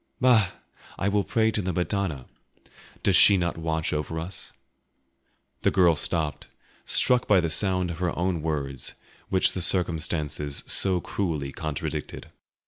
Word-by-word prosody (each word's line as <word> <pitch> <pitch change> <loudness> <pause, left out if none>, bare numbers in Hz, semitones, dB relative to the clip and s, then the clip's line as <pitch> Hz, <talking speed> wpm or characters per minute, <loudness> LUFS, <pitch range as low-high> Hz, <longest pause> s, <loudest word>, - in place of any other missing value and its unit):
"Bah! 120 -7 +4 0.5
I 95 - -1
will 100 0 +1
pray 110 +1 +1
to 105 - -1
the 95 -1 -2
Madonna. 90 -6 -2 0.8
Does 95 - +3
she 100 0 +7
not 85 -1 -1
watch 80 -1 -2
over 75 +2 -3
us?" 90 +5 -7 1.1
The - - +3
girl 85 -3 +4
stopped, 75 -2 -3 0.4
struck 125 -1 +3
by 100 -3 +5
the 85 -2 -1
sound 90 0 +1
of 85 - -8
her 90 -2 -2
own 90 -1 -1
words, 70 -4 -4 0.3
which 95 - +2
the 95 - -4
circumstances 80 -5 0
so 95 -3 +4
cruelly 80 -9 -3
contradicted. 75 -2 -5
85 Hz, 140 wpm, -25 LUFS, 80-95 Hz, 1.1 s, she